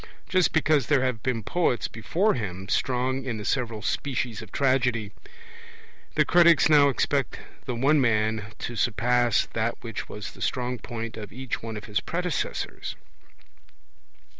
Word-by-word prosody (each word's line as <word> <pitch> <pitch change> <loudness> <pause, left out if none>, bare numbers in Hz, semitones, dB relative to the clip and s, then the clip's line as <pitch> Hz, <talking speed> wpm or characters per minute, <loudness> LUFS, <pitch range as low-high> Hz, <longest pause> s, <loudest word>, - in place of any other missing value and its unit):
Just 185 -2 +3
because 155 -5 +2
there 140 -3 +3
have 125 -4 -1
been 115 -3 -1
poets 125 - 0
before 175 - 0
him 95 -5 -4
strong 130 +1 0
in 120 -4 -3
the 105 - -6
several 115 -3 -1
species 125 -6 -2
of 110 - -11
tragedy, 125 -6 +1 1.0
the - - +4
critics 170 -2 +6
now 145 -2 +6
expect 140 +1 0 0.3
the 125 - -3
one 140 +5 +3
man 110 -3 +1
to 120 - -5
surpass 120 +1 +2
that - - 0
which - - -6
was - - -6
the - - -15
strong 125 -1 -1
point 115 0 -6
of 105 -2 -7
each 130 +1 -4
one 110 -1 -5
of 105 - -8
his 105 -2 0
predecessors. 180 0 -3
125 Hz, 150 wpm, -26 LUFS, 110-140 Hz, 1.0 s, critics